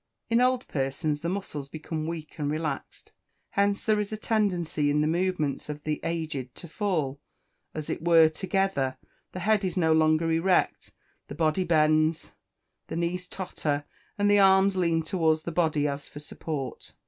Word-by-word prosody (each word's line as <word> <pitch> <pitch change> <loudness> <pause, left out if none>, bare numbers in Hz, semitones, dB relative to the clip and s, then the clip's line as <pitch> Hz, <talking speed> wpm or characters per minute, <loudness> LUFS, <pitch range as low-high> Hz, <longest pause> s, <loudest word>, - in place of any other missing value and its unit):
In 230 +1 +4
old 255 0 +2
persons 145 +2 -2
the 170 - -2
muscles 165 -7 -4
become 155 +1 -5
weak 165 -1 -6
and 145 -1 -1
relaxed; 155 +1 -4 0.4
hence 200 0 +1
there 215 -1 +2
is 210 0 -3
a 215 - -3
tendency 180 -9 0
in 150 +1 +2
the - - +2
movements 165 -4 -1
of 150 0 -6
the 155 -1 -2
aged 155 -7 -3
to 170 - -9
fall, 155 -7 -1 0.6
as 155 -1 -4
it - - -3
were, 165 -2 +7
together; 185 -5 -1 0.3
the 185 - -6
head 215 -1 +2
is 185 -1 -2
no 160 -3 +3
longer 160 +1 +3
erect, 175 +3 +1 0.4
the 140 - -8
body 160 +4 +1
bends, 155 -1 +2 0.6
the - - -5
knees 175 +2 -2
totter, 150 -6 -3 0.3
and 205 0 +2
the 205 0 +5
arms 190 0 +5
lean 170 -3 +1
towards 160 -2 +1
the 170 - -4
body 155 -3 +1
as 140 0 -4
for - - -13
support. 150 -2 -6
165 Hz, 170 wpm, -27 LUFS, 150-190 Hz, 0.6 s, were